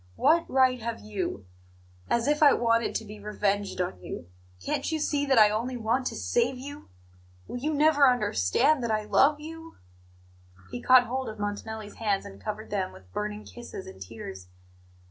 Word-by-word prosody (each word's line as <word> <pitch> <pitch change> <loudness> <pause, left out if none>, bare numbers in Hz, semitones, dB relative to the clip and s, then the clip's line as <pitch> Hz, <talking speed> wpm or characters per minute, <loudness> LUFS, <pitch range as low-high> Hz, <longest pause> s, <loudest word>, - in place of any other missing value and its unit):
What 330 - +3
right 255 -2 +3
have 230 0 -4
you 190 - -4 0.6
As 235 +2 +1
if 295 +1 +2
I 290 -2 +8
wanted 230 -1 +1
to 220 - -2
be 210 0 -10
revenged 205 -1 -1
on 135 - -2
you! 85 -1 -7 0.3
Can't 90 - -2
you 320 - 0
see 290 -1 0
that 265 -2 +3
I 210 -1 +7
only 240 +4 -2
want 240 +3 0
to - - -4
save 470 - 0
you? 285 - -9 0.6
Will - - -5
you 300 +5 -1
never 295 -2 +5
understand 245 - +2
that 235 - -1
I 215 -1 +1
love 285 +7 +3
you?" 325 +1 -10 0.9
He 245 - -5
caught 255 -1 +6
hold 260 +2 -3
of 215 - -8
Montanelli's 205 +1 -5
hands 205 -3 0
and 95 +1 -11
covered 215 0 -5
them 190 -3 -1
with 90 -1 -17
burning 210 0 -4
kisses 240 -5 -9
and 95 0 -12
tears. 95 -2 -8
230 Hz, 180 wpm, -27 LUFS, 205-270 Hz, 0.9 s, I